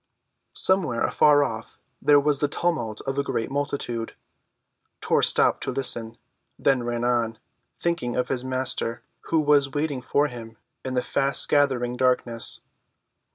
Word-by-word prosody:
Somewhere, 175 Hz, -12 st, +1 dB
afar 145 Hz, -1 st, +4 dB
off, 110 Hz, -4 st, -6 dB, 0.2 s
there 145 Hz, -1 st, +6 dB
was 145 Hz, -1 st, +2 dB
the 145 Hz, -, +2 dB
tumult 140 Hz, -9 st, -2 dB
of 135 Hz, +1 st, -3 dB
a -, -, +1 dB
great 115 Hz, -3 st, -3 dB
multitude. 140 Hz, -5 st, -3 dB, 0.8 s
Tor -, -, +1 dB
stopped -, -, +3 dB
to -, -, -2 dB
listen, 115 Hz, -4 st, -2 dB, 0.4 s
then 135 Hz, -2 st, +2 dB
ran 120 Hz, 0 st, -3 dB
on, 120 Hz, -2 st, 0 dB, 0.4 s
thinking 170 Hz, -8 st, -1 dB
of 125 Hz, 0 st, 0 dB
his 130 Hz, -2 st, -2 dB
Master, 130 Hz, -3 st, -2 dB, 0.2 s
who 165 Hz, -, +1 dB
was 145 Hz, -3 st, +3 dB
waiting 145 Hz, -3 st, -1 dB
for 145 Hz, +4 st, +1 dB
him 115 Hz, -4 st, -8 dB, 0.3 s
in 130 Hz, -1 st, -4 dB
the 125 Hz, -, +2 dB
fast‐gathering 135 Hz, -2 st, +1 dB
darkness. 125 Hz, -2 st, +1 dB
130 Hz, 140 wpm, -25 LUFS, 120-145 Hz, 0.8 s, there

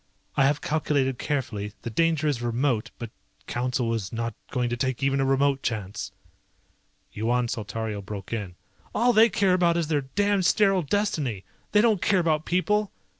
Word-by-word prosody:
I 135 Hz, -, +4 dB
have 145 Hz, +1 st, +1 dB
calculated 140 Hz, -4 st, 0 dB
carefully, 105 Hz, -8 st, -3 dB
the 115 Hz, -, -4 dB
danger 160 Hz, +3 st, +1 dB
is 140 Hz, -5 st, 0 dB
remote, 120 Hz, -1 st, 0 dB
but 115 Hz, -2 st, -7 dB, 0.3 s
Council 120 Hz, -1 st, -1 dB
is 100 Hz, -5 st, -3 dB
not 115 Hz, 0 st, -3 dB, 0.2 s
going 125 Hz, -1 st, 0 dB
to -, -, 0 dB
take 130 Hz, +1 st, -2 dB
even 140 Hz, 0 st, +2 dB
a -, -, +2 dB
remote 135 Hz, 0 st, +2 dB
chance." 105 Hz, -4 st, -4 dB, 1.0 s
Yuan 120 Hz, +3 st, 0 dB
Saltario 110 Hz, -1 st, -4 dB
broke 100 Hz, +1 st, -7 dB
in. 100 Hz, -6 st, -4 dB, 0.4 s
"All 245 Hz, +1 st, +3 dB
they 225 Hz, +2 st, +6 dB
care 195 Hz, -4 st, +2 dB
about 170 Hz, -2 st, +3 dB
is 165 Hz, -2 st, -1 dB
their 150 Hz, -3 st, +2 dB
damned 200 Hz, +7 st, +1 dB
sterile 195 Hz, -3 st, +3 dB
destiny! 150 Hz, -, -1 dB, 0.3 s
They 210 Hz, -, +5 dB
don't 220 Hz, -5 st, +3 dB
care 200 Hz, -, +3 dB
about 160 Hz, -3 st, +1 dB
people. 210 Hz, +3 st, +1 dB
135 Hz, 170 wpm, -26 LUFS, 115-170 Hz, 1.0 s, they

